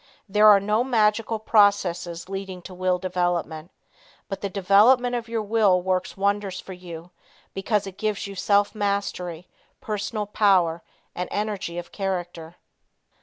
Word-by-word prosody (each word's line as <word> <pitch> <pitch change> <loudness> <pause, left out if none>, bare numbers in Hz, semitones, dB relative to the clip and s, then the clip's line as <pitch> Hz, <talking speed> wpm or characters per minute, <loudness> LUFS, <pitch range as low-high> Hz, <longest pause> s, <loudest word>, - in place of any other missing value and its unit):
There 210 +2 +4
are 205 -2 +8
no 210 +4 +1
magical 225 -2 +1
processes 190 -6 +1
leading 190 -2 -6
to 185 - -10
will 185 0 0
development, 175 -3 -2 0.6
but 195 - -5
the 200 - -2
development 210 +7 +4
of 235 -1 -4
your 225 -1 -2
will 205 -3 +3
works 185 +1 -2
wonders 200 -1 -1
for 190 - -9
you 175 -1 -10 0.4
because 205 +1 -1
it 195 -1 -10
gives 215 -2 -2
you 200 - -7
self 200 +2 +2
mastery, 200 -5 -3 0.3
personal 210 0 -3
power 185 -5 +2 0.3
and 180 - -4
energy 205 -4 -3
of 175 - -7
character. 175 -4 -4
195 Hz, 140 wpm, -24 LUFS, 180-210 Hz, 0.6 s, are